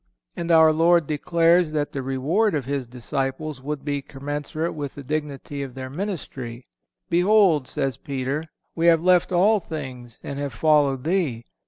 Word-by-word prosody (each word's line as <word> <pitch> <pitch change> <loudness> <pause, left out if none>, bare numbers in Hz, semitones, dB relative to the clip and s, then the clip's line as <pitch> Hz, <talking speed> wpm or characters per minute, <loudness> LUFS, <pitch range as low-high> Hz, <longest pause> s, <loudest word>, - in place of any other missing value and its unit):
And 170 0 -4
our 160 -1 +6
Lord 170 +1 +4
declares 165 +2 +2
that 150 -1 -1
the 135 - -3
reward 150 +11 +1
of 140 -4 -2
His 135 -2 -3
disciples 135 +4 -3
would 145 0 -5
be 145 -1 -1
commensurate 145 +4 -4
with 145 -3 -5
the 140 - -8
dignity 145 -1 -4
of 135 -2 -6
their 130 -1 -6
ministry: 135 - -5 0.5
"Behold," 180 -5 +4
says 135 -3 -2
Peter, 140 +2 -3 0.3
"we 165 +1 +2
have 165 -1 +5
left 180 0 +4
all 200 +5 +4
things 130 - -8
and 140 0 -5
have 145 -1 -3
followed 145 -4 +2
Thee. 155 -10 -1
150 Hz, 160 wpm, -24 LUFS, 135-165 Hz, 0.5 s, our